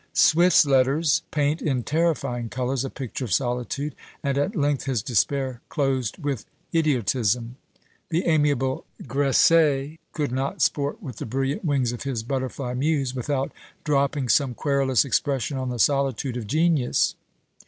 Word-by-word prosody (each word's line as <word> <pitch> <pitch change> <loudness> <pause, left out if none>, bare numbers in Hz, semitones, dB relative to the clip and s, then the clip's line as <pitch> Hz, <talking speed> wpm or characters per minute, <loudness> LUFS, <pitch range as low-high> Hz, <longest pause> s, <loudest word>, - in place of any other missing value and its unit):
Swift's 170 0 +5
letters 135 +2 +3
paint 150 +1 0
in 130 -6 0
terrifying 150 -7 0
colours 130 +1 -1
a 135 - -3
picture 130 0 -5
of 110 - -7
solitude, 125 +6 -1 0.3
and 140 -1 0
at 145 +10 0
length 145 -4 0
his 130 -7 -1
despair 130 +1 0
closed 135 -6 -1
with 145 - -3 0.3
idiotism. 125 -6 +1 0.5
The 170 +1 0
amiable 145 -5 +1 0.2
Gresset 145 +2 +3
could 145 -5 -2
not 135 +2 -2
sport 145 -1 0
with 125 -5 -7
the - - -5
brilliant 135 - -2
wings 140 -7 +1
of 120 - -6
his 130 -5 -3
butterfly 130 0 -3
muse, 135 -1 0
without 135 +1 -2 0.3
dropping 140 -2 +1
some 130 0 +2
querulous 140 -2 +2
expression 135 0 0
on 130 -1 -2
the 125 - -3
solitude 135 0 +1
of 115 -4 -5
genius. 155 -2 +2
135 Hz, 145 wpm, -24 LUFS, 125-145 Hz, 0.5 s, Swift's